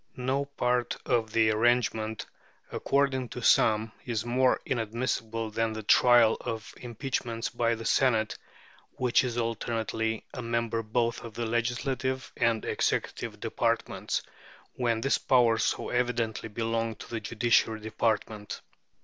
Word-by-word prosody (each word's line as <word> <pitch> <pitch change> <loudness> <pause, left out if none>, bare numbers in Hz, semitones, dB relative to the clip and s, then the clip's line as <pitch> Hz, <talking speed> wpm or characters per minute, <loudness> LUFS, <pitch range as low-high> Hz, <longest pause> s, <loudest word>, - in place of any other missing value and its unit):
No 130 +3 0
part 125 -3 -1
of 115 -4 +1
the 110 -1 +3
arrangement, 110 -1 +1 0.5
according 135 -3 0
to 125 +2 -7
some, 110 0 +4
is 115 -3 -2
more 125 +2 +3
inadmissible 115 -1 -2
than 115 0 0
the 110 0 -6
trial 120 0 +6
of 110 -1 -5
impeachments 120 -1 -3
by 115 0 0
the 115 0 -8
Senate, 110 -5 +2 0.6
which 125 0 +2
is 120 -2 -3
alternately 115 -1 -2
a 125 - -5
member 115 -1 -1
both 115 +1 -1
of 115 -2 -9
the 120 - -2
legislative 125 +3 -1
and 115 -2 +1
executive - - -1
departments, - - -1 0.5
when 115 -3 0
this 135 - +2
power 120 -3 +4
so - - 0
evidently 120 -3 -1
belonged 115 0 -2
to - - -10
the 115 - -2
judiciary 110 0 +2
department. 110 -1 -2
115 Hz, 130 wpm, -28 LUFS, 110-125 Hz, 0.6 s, trial